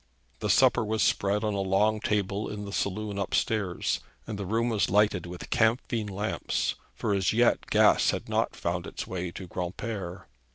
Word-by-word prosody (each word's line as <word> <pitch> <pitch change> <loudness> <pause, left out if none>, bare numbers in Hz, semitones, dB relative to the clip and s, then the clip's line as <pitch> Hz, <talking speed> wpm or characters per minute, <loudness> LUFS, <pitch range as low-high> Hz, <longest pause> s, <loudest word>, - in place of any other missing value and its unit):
The - - -2
supper - - +5
was 110 0 0
spread 100 +2 +1
on 105 -1 0
a 100 - -1
long 100 +3 +2
table 105 0 -1
in 105 -1 -5
the 100 - -7
saloon 100 +1 -2
up 100 - -1
stairs, 100 -6 0 0.3
and 105 -3 -5
the 100 - -4
room 115 +4 +1
was 110 -3 +1
lighted 100 -3 +2
with 90 0 -8
camphine 115 -1 +1
lamps, 105 +2 -1 0.2
for 105 - -1
as 95 -1 +1
yet 120 +2 +2
gas - - +5
had - - -2
not - - 0
found - - -2
its - - -5
way 90 -1 -4
to 95 - -7
Granpere. 90 +1 -5
100 Hz, 180 wpm, -28 LUFS, 95-110 Hz, 0.3 s, supper